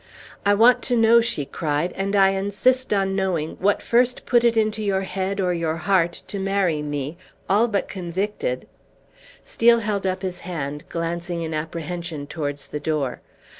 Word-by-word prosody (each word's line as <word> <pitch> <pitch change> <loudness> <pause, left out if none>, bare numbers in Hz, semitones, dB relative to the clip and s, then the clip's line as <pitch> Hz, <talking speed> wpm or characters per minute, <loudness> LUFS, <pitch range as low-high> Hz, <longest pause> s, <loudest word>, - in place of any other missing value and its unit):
"I 205 - +5
want 235 +4 +5
to 245 -2 +1
know," 230 +1 +6
she 155 -11 -1
cried, 150 +4 -2
"and 195 +1 -1
I 195 -1 +6
insist 205 +7 +1
on 195 -2 +1
knowing, 180 -5 -1
what 205 +2 +1
first 245 +1 +2
put 240 -1 +3
it 235 -1 +3
into 215 0 +1
your 195 -2 0
head 195 +1 -3
or 180 -2 +1
your 165 -2 -1
heart 170 0 +1
to 200 - -5
marry 190 -5 +1
me 145 +1 -4 0.3
all 210 +5 +3
but 205 -3 -1
convicted 200 - -3 0.4
" - - -35 0.3
Steel 235 0 +4
held 205 -3 -1
up 185 +1 -2
his 185 -1 -4
hand, 150 -5 -5
glancing 170 +1 -3
in 160 0 -4
apprehension 165 0 -4
towards 145 -2 -5
the 150 - -4
door. 150 -5 -2
190 Hz, 170 wpm, -23 LUFS, 165-205 Hz, 0.4 s, know